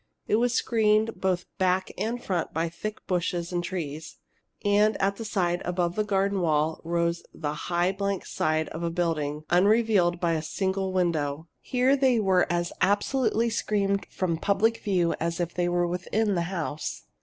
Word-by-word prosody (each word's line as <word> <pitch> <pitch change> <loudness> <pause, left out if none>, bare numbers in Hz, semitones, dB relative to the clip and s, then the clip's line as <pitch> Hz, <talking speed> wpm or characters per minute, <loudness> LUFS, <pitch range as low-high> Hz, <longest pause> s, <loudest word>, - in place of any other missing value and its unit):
It 215 - +2
was 240 +1 +1
screened 220 -2 +2
both 185 -2 0
back 185 0 +1
and 235 +3 -2
front 175 -5 -2
by 165 +1 0
thick 215 +5 -6
bushes 175 -1 -1
and 175 0 0
trees. 160 -4 -5 0.5
And 205 +1 +3
at 200 +1 +1
the 230 - -5
side, 175 -5 0
above 175 -1 -1
the 215 - +1
garden 200 -1 +1
wall, 155 -1 +1
rose 170 0 0
the 150 -2 -3 0.2
high 175 +1 +2
blank 200 0 -2
side 155 0 0
of 160 - -6
a 170 - 0
building, 155 -4 -1
unrelieved 195 -2 +3
by 170 -2 +1
a 160 - 0
single 190 +3 -2
window. 160 -4 0
Here 255 +2 +2
they 260 -4 +3
were 190 -4 +2
as 175 0 -1
absolutely 225 +4 +2
screened 200 -3 0
from 170 -3 -1
public 205 +6 +2
view 180 -4 +1
as 170 +1 -2
if 175 -1 -2
they 175 0 0
were 175 0 +1
within 190 +5 0
the 170 -2 0
house. 160 -5 -4
180 Hz, 170 wpm, -27 LUFS, 170-205 Hz, 0.5 s, And